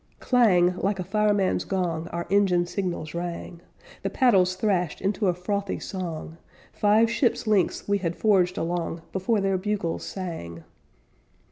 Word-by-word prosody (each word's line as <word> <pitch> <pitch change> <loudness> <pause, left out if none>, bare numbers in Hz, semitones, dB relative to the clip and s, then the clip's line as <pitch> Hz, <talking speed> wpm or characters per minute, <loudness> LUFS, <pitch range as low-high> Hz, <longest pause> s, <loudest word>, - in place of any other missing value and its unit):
"Clang!" 185 -8 +4
like 195 +2 0
a 185 - -3
fireman's 205 0 +1
gong 170 -4 -2
Our 170 0 -4
engine 190 -3 +3
signals 175 -4 -4
rang; 170 0 -5 0.4
The - - -2
paddles 190 -8 +3
thrashed 185 -5 0
into 200 +1 0
a 180 - +3
frothy 200 +2 -2
song; 165 -4 -6 0.4
Five 215 +2 +4
ship's 235 0 0
lengths 210 -4 +1
we 200 0 +2
had 170 -2 -2
forged 185 -4 +2
along 170 -1 -2
Before 195 +4 0
their 195 -1 +1
bugles 200 -4 -2
sang. 85 - -6
185 Hz, 140 wpm, -25 LUFS, 175-205 Hz, 0.4 s, Clang